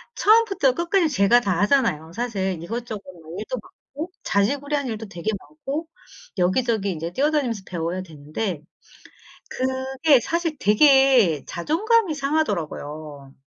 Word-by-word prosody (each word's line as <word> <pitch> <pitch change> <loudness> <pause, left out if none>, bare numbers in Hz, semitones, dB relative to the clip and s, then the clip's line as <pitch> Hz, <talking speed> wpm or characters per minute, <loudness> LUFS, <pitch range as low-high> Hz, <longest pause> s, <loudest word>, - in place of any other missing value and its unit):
처음부터 405 - +4
끝까지 340 +2 +1
제가 240 -3 +4
다 195 -7 0
하잖아요. 205 - +1
사실 195 -7 -2
이것저것 225 +2 -5 0.2
뭐 160 +2 -10
일도 220 +4 -4
많고 305 +10 -9
자질구레한 280 +7 0
일도 220 -2 -5
되게 175 +1 -5
많고 310 - -6 0.5
여기저기 200 +2 +1
이제 165 0 -4
뛰어다니면서 270 -6 0
배워야 175 +1 -3
되는데 155 +2 -5 0.9
그게 260 +2 +2
사실 330 +4 -2
되게 245 - +5
자존감이 385 - +1
상하더라고요. 155 - -3
240 Hz, 310 characters per minute, -23 LUFS, 185-290 Hz, 0.9 s, 되게